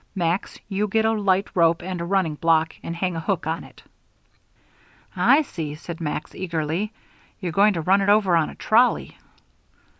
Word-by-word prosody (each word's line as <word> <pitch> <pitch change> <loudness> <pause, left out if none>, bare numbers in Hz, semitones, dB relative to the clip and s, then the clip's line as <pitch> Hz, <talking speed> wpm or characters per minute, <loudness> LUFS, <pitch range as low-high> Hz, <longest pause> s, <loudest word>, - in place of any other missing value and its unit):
Max, 175 0 -1
you 205 +1 -1
get 220 +2 +1
a 220 - +3
light 200 -3 +1
rope 170 -1 +3
and 180 -1 -4
a - - -3
running 185 -3 +1
block, 160 +1 +2
and 170 - -5
hang 180 0 -2
a - - -2
hook 180 0 -2
on 160 +2 -2
it." - - -16 1.3
"I 300 +3 +4
see," 155 - -6
said 170 +2 -8
Max, 150 -1 -4
eagerly. 170 +3 -2 0.5
"You're 180 -4 -3
going 200 +5 +4
to 165 - -2
run 190 +5 +3
it 195 - +1
over 205 -4 +4
on 160 -2 +2
a - - -10
trolley." 240 +3 +2
180 Hz, 180 wpm, -23 LUFS, 165-200 Hz, 1.3 s, I